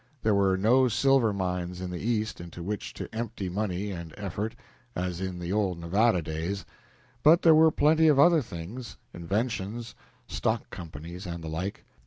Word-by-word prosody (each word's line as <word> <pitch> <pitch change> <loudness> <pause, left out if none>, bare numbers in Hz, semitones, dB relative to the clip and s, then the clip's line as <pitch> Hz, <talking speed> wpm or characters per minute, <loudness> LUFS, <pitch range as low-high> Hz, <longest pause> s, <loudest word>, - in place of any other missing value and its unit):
There 110 - +3
were 95 -1 +3
no 125 +6 +4
silver 125 -1 +3
mines 90 -2 -3
in 90 -1 -4
the 90 - -4
East 110 -3 -1
into 85 0 -8
which 105 +2 -4
to - - -5
empty 110 -4 -4
money 100 +1 -2
and 85 -4 -7
effort, 105 +3 -4 0.4
as 90 0 -3
in 95 -1 -3
the 90 +1 -3
old 100 -4 +1
Nevada 90 +3 +2
days, 85 +6 -3 0.6
but 165 +3 +6
there 165 - +8
were 160 +1 +7
plenty 160 +1 +4
of 150 -3 +5
other 165 +2 +6
things 110 +4 -8 0.2
inventions, 105 +4 -3 0.3
stock - - -2
companies, 85 +3 -8
and 85 -1 -5
the 80 - -5
like. 90 +5 -4
100 Hz, 170 wpm, -28 LUFS, 90-115 Hz, 0.6 s, there